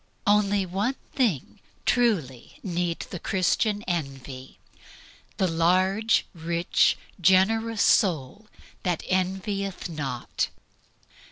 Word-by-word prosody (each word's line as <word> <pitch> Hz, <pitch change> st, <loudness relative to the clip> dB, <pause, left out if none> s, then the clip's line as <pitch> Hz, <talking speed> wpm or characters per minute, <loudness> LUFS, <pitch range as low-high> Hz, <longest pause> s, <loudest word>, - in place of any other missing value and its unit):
Only 205 Hz, -1 st, +3 dB
one 200 Hz, +9 st, -1 dB, 0.2 s
thing 210 Hz, -, 0 dB, 0.3 s
truly 180 Hz, -, 0 dB
need 175 Hz, -3 st, -2 dB
the 180 Hz, -, -5 dB
Christian 205 Hz, +4 st, +1 dB
envy 135 Hz, -6 st, -5 dB, 0.8 s
the 190 Hz, -, +2 dB
large, 185 Hz, +6 st, +2 dB
rich, 170 Hz, 0 st, +1 dB, 0.2 s
generous 205 Hz, +5 st, +3 dB
soul 180 Hz, -, +2 dB, 0.4 s
which 175 Hz, -3 st, -1 dB
"envieth 190 Hz, +1 st, -1 dB
not." 140 Hz, -7 st, -3 dB
185 Hz, 85 wpm, -26 LUFS, 165-205 Hz, 0.8 s, Only